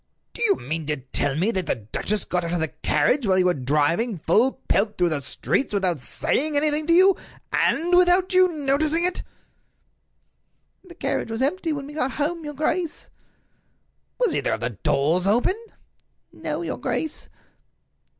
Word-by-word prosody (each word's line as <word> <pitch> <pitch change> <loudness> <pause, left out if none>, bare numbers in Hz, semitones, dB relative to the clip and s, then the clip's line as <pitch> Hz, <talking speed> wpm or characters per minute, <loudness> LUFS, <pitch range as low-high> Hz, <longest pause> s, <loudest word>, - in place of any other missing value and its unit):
"Do - - -8
you 420 -4 +4
mean 160 - -5
to 150 -1 -1
tell 135 +1 -2
me 185 +9 +1
that 185 -5 -1
the - - +1
duchess 180 - -3
got 180 -1 -1
out 170 0 -3
of 175 - 0
the 160 -1 0
carriage 205 - +1
while 190 -1 +3
you 185 - +3
were 180 - +3
driving 150 - 0
full 220 - +2
pelt 210 +2 +1
through 175 -1 +2
the 155 -3 -2
streets 210 - -1
without 185 -5 +1
saying 290 - +1
anything 300 +1 +1
to 335 - +4
you, 375 +2 +6 0.4
and 350 +2 +2
without 360 +1 +4
you 370 0 +6
noticing 305 +1 +1
it?" 360 +1 0 1.6
"The 355 -2 -14
carriage 340 - -2
was 225 +3 -2
empty 330 +3 0
when 285 -2 -4
we 290 - -10
got 270 -3 -2
home, 320 +3 -2
your 295 -1 -7
grace." 310 +3 -2 1.1
"Was - - +1
either - - 0
of - - -4
the - - -2
doors 160 +7 0
open?" 250 - +1 0.7
"No, - - -4
your - - -4
grace." 315 -2 -3
255 Hz, 170 wpm, -23 LUFS, -, 1.6 s, you